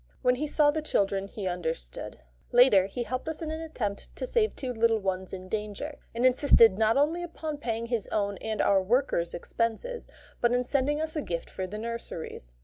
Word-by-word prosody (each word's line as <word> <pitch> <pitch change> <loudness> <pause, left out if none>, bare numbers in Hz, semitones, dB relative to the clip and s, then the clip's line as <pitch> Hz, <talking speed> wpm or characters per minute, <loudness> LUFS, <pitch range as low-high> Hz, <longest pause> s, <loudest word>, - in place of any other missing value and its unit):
When 250 - +5
he 300 +3 -1
saw 295 0 +4
the 310 +1 -2
children 195 -8 0
he 200 0 -6
understood. 165 - -4 0.3
Later, 240 -6 +6
he 240 +5 -3
helped 255 +5 -3
us 320 - -4
in 310 - -3
an 315 +1 -4
attempt 230 -11 -4
to - - -3
save 460 -3 +1
two 255 -3 -3
little 225 0 +3
ones 190 -2 -2
in 185 -1 -7
danger, 215 +8 -4 0.2
and 240 +2 +1
insisted 250 -5 +6
not 220 +4 +3
only 310 +5 +2
upon 315 -3 -5
paying 230 -4 -2
his 235 -3 -2
own 200 -2 -1
and 220 -1 -2
our 195 -1 +4
worker's 185 -5 +1
expenses, 230 - -2 0.3
but 240 0 +3
in 250 0 +2
sending 280 +3 +1
us 315 0 -2
a 305 - 0
gift 170 -9 -4
for 185 - -4
the 210 +3 -6
nurseries. 215 - -6
230 Hz, 200 wpm, -28 LUFS, 200-290 Hz, 0.3 s, Later